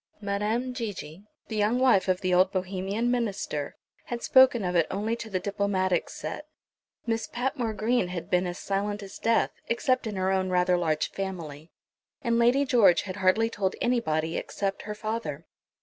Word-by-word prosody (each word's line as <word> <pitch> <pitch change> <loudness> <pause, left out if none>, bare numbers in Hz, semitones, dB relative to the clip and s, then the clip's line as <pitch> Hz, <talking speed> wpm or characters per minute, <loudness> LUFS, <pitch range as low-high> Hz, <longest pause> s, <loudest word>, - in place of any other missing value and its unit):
Madame 215 +5 -1
Gigi, 205 - -6 0.2
the 220 - -5
young 215 +3 +2
wife 250 -8 +4
of 185 0 +1
the 185 -1 +1
old 185 +1 +4
Bohemian 195 +5 -1
minister, 205 -11 -2 0.3
had 240 -1 -5
spoken 260 -5 +5
of 180 0 -1
it 170 -2 +3
only 210 +4 -1
to 230 -1 -8
the 190 -3 -1
diplomatic 190 -3 0
set; 165 - -6 0.6
Miss 225 -2 -1
Patmore 245 -2 -2
Green 220 -1 +1
had 180 -2 -5
been 180 0 +1
as 175 +1 -5
silent 205 +1 -2
as 195 - -10
death, 230 0 +2 0.2
except 255 +1 +1
in 210 - -4
her 190 0 0
own 190 -1 +1
rather 180 0 +3
large 160 -3 0
family, 165 -6 -6 0.5
and 235 -2 +2
Lady 250 +4 +4
George 210 - +5
had 185 -2 -6
hardly 190 +4 +3
told 200 -4 -2
anybody, 165 -10 0
except 195 -1 -3
her 210 - -3
father. 215 -9 -4
200 Hz, 170 wpm, -27 LUFS, 185-230 Hz, 0.6 s, spoken